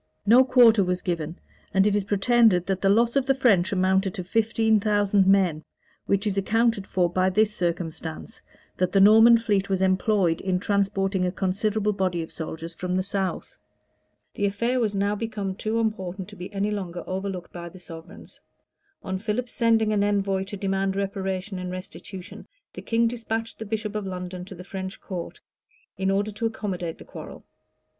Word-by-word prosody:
[] -, -, -48 dB
No 240 Hz, +5 st, +7 dB
quarter 235 Hz, -5 st, +6 dB
was 180 Hz, 0 st, -2 dB
given; 170 Hz, -2 st, -3 dB, 0.4 s
and 190 Hz, 0 st, +5 dB
it 210 Hz, -1 st, +2 dB
is 205 Hz, -2 st, 0 dB
pretended 205 Hz, -2 st, +3 dB
that 190 Hz, -1 st, -2 dB
the 195 Hz, -, +3 dB
loss 235 Hz, +4 st, +3 dB
of 270 Hz, -1 st, +1 dB
the 270 Hz, -, +3 dB
French 210 Hz, -8 st, +3 dB
amounted 190 Hz, 0 st, +1 dB
to 185 Hz, -, -4 dB
fifteen 220 Hz, +2 st, +2 dB
thousand 205 Hz, -2 st, +2 dB
men; 185 Hz, -6 st, +3 dB, 0.4 s
which 200 Hz, +2 st, +1 dB
is 200 Hz, -2 st, 0 dB
accounted 225 Hz, 0 st, +1 dB
for 180 Hz, -2 st, +1 dB
by 185 Hz, +2 st, +1 dB
this 210 Hz, +2 st, +2 dB
circumstance, 165 Hz, -2 st, -4 dB, 0.4 s
that 185 Hz, 0 st, +1 dB
the 195 Hz, -, +4 dB
Norman 225 Hz, +4 st, +8 dB
fleet 205 Hz, -4 st, 0 dB
was 190 Hz, -1 st, +1 dB
employed 185 Hz, -2 st, +2 dB
in 185 Hz, -1 st, 0 dB
transporting 195 Hz, -1 st, 0 dB
a 180 Hz, -, 0 dB
considerable 205 Hz, +3 st, 0 dB
body 185 Hz, -4 st, -1 dB
of 160 Hz, -, -10 dB
soldiers 165 Hz, +1 st, -6 dB
from 180 Hz, +2 st, -3 dB
the 185 Hz, -, +1 dB
south. 195 Hz, -1 st, -3 dB, 0.8 s
The 200 Hz, -, 0 dB
affair 235 Hz, +6 st, 0 dB
was 215 Hz, -4 st, 0 dB
now 200 Hz, +1 st, +1 dB
become 210 Hz, -3 st, -3 dB
too 220 Hz, +4 st, -2 dB
important 190 Hz, -4 st, -3 dB
to 205 Hz, -, -12 dB
be 180 Hz, +1 st, -8 dB
any 205 Hz, +1 st, -1 dB
longer 180 Hz, -4 st, -4 dB
overlooked 190 Hz, -1 st, -5 dB
by 170 Hz, -1 st, -7 dB
the 185 Hz, +2 st, -14 dB
sovereigns. 165 Hz, -2 st, -11 dB, 0.6 s
On 190 Hz, -1 st, -3 dB
Philip's 225 Hz, +4 st, -3 dB
sending 225 Hz, -2 st, +2 dB
an 205 Hz, -1 st, +2 dB
envoy 195 Hz, -2 st, 0 dB
to 200 Hz, +1 st, -7 dB
demand 195 Hz, 0 st, -1 dB
reparation 195 Hz, -1 st, -3 dB
and 180 Hz, 0 st, -5 dB
restitution, 185 Hz, 0 st, -9 dB, 0.3 s
the -, -, -8 dB
king 230 Hz, 0 st, +1 dB
despatched 225 Hz, -1 st, -4 dB
the 220 Hz, -, -5 dB
bishop 215 Hz, 0 st, -3 dB
of 210 Hz, -2 st, -3 dB
London 180 Hz, -1 st, -6 dB
to 195 Hz, 0 st, -10 dB
the 180 Hz, -, -10 dB
French 190 Hz, +1 st, -6 dB
court, 180 Hz, -4 st, -7 dB, 0.6 s
in 190 Hz, 0 st, -1 dB
order 200 Hz, +2 st, 0 dB
to 225 Hz, +3 st, -2 dB
accommodate 185 Hz, -7 st, -4 dB
the -, -, -13 dB
quarrel. -, -, -10 dB
195 Hz, 180 wpm, -25 LUFS, 185-215 Hz, 0.8 s, Norman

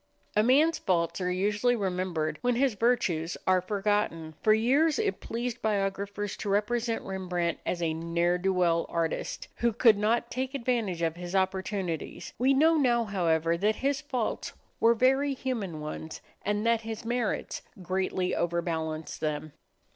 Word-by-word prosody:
A 210 Hz, -, +5 dB
man's 290 Hz, +8 st, +4 dB
faults 170 Hz, 0 st, 0 dB
are 180 Hz, -, 0 dB
usually 210 Hz, +6 st, +1 dB
remembered 180 Hz, -6 st, -2 dB
when 245 Hz, 0 st, +1 dB
his 260 Hz, 0 st, +2 dB
virtues 190 Hz, -7 st, +1 dB
are 185 Hz, -1 st, +4 dB
forgotten. 195 Hz, -5 st, -1 dB
For 215 Hz, -, +4 dB
years 275 Hz, +9 st, +3 dB
it 420 Hz, -3 st, 0 dB
pleased 240 Hz, +1 st, -4 dB
biographers 200 Hz, -1 st, -1 dB
to 205 Hz, -, -4 dB
represent 225 Hz, +3 st, 0 dB
Rembrandt 180 Hz, -3 st, -2 dB
as 175 Hz, -1 st, -1 dB
a 160 Hz, -1 st, +1 dB
ne'er 170 Hz, +2 st, 0 dB
do 190 Hz, +2 st, +1 dB
well 170 Hz, -2 st, +2 dB
artist, 165 Hz, -1 st, -2 dB
who 235 Hz, 0 st, +2 dB
could 220 Hz, -1 st, +5 dB
not 220 Hz, +3 st, +1 dB
take 260 Hz, +2 st, -3 dB
advantage 230 Hz, -9 st, -1 dB
of 165 Hz, 0 st, 0 dB
his 175 Hz, +1 st, -5 dB
opportunities. 190 Hz, -2 st, -2 dB
We 260 Hz, +2 st, +4 dB
know 315 Hz, +4 st, +5 dB
now, 240 Hz, -5 st, +3 dB
however, 170 Hz, -5 st, +1 dB
that 210 Hz, +3 st, +2 dB
his 280 Hz, +1 st, +1 dB
faults 255 Hz, -6 st, -3 dB, 0.3 s
were 230 Hz, +1 st, +5 dB
very 270 Hz, +4 st, +3 dB
human 210 Hz, -12 st, -3 dB
ones, 155 Hz, +1 st, -6 dB, 0.2 s
and 205 Hz, +1 st, -1 dB
that 230 Hz, -1 st, +3 dB
his 225 Hz, 0 st, -6 dB
merits 240 Hz, -1 st, -2 dB, 0.2 s
greatly 185 Hz, 0 st, -1 dB
overbalanced 165 Hz, -2 st, -2 dB
them. 150 Hz, -1 st, -3 dB
200 Hz, 155 wpm, -28 LUFS, 175-235 Hz, 0.3 s, A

